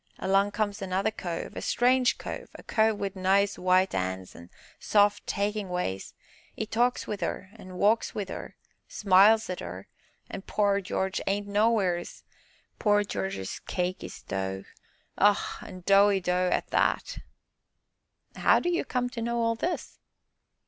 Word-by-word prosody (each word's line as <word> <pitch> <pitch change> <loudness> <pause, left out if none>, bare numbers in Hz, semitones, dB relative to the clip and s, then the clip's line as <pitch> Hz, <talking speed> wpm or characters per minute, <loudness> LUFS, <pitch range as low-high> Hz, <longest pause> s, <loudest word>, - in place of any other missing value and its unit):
Along 195 +1 +2
comes 205 -1 -2
another 195 +3 0
cove 175 -5 -5
a - - -4
strange 250 +1 +2
cove - - -7
a - - -11
cove 220 -1 +2
wi' 200 -1 -2
nice 195 +1 +2
white 185 +1 +3
'ands 95 0 -3
an' 85 +1 -12 0.3
soft, 205 -1 +2
takin' 205 -1 -1
ways 180 - -3 0.4
'e 220 - -2
talks 240 +3 +1
wi' 210 - -3
'er 185 - -4
walks 200 +4 0
wi' 205 - -2
'er - - -7 0.3
smiles 205 +3 +5
at 180 - -4
'er - - -7 0.4
an' 195 - -7
pore 200 0 +1
Jarge 190 +1 -2
ain't 200 +1 0
nowheeres 205 -4 0 0.6
pore 205 -2 +3
Jarge's 190 - -4
cake 180 0 -2
is - - -9
dough 95 0 -3 0.6
ah! 205 0 +2
an' 185 - -10
doughy 200 0 +5
dough 180 0 +1
at - - -1
that!" - - 0 1.2
"How - - +4
do 350 - -1
you 345 - 0
come 250 -1 -1
to 235 - -5
know 235 +1 -1
all 230 0 +2
this?" 340 +11 -4
200 Hz, 150 wpm, -28 LUFS, 185-215 Hz, 1.2 s, smiles